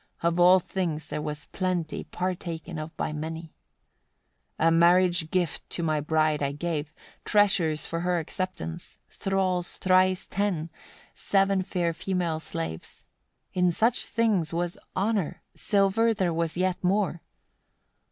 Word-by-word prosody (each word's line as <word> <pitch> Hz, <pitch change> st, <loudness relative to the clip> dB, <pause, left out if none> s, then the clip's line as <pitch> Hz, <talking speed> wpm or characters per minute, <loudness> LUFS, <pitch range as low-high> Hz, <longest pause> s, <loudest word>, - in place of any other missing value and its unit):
Of 170 Hz, +1 st, +1 dB
all 180 Hz, +2 st, +7 dB
things 165 Hz, -4 st, -3 dB
there 150 Hz, -, -3 dB
was 150 Hz, -1 st, -4 dB
plenty 180 Hz, -4 st, -2 dB
partaken 175 Hz, -2 st, -4 dB
of 155 Hz, +1 st, -7 dB
by 155 Hz, -, -2 dB
many. 160 Hz, +1 st, -5 dB, 1.0 s
94. 165 Hz, -, +3 dB
A -, -, +5 dB
marriage 175 Hz, 0 st, +4 dB
gift 180 Hz, -2 st, -1 dB
to 170 Hz, -, -3 dB
my 155 Hz, -2 st, +1 dB
bride 155 Hz, 0 st, +1 dB
I 140 Hz, 0 st, 0 dB
gave, 150 Hz, -1 st, -3 dB, 0.3 s
treasures 185 Hz, -7 st, +2 dB
for 165 Hz, -, -3 dB
her 180 Hz, +1 st, +1 dB
acceptance, 160 Hz, -, -4 dB
thralls 185 Hz, -2 st, -1 dB
thrice 185 Hz, 0 st, +3 dB
ten, 180 Hz, -5 st, -1 dB, 0.4 s
seven 195 Hz, -1 st, +2 dB
fair 175 Hz, -2 st, -1 dB
female 175 Hz, -2 st, -1 dB
slaves: 80 Hz, -, -6 dB, 0.5 s
in 180 Hz, -1 st, +3 dB
such 225 Hz, +8 st, +2 dB
things 210 Hz, -9 st, +1 dB
was 175 Hz, +1 st, -1 dB, 0.2 s
honour; 200 Hz, -3 st, -1 dB
silver 210 Hz, +3 st, +2 dB
there 180 Hz, -4 st, 0 dB
was 165 Hz, 0 st, -1 dB
yet 185 Hz, 0 st, 0 dB
more. 185 Hz, -2 st, +1 dB
175 Hz, 135 wpm, -27 LUFS, 160-185 Hz, 1.0 s, all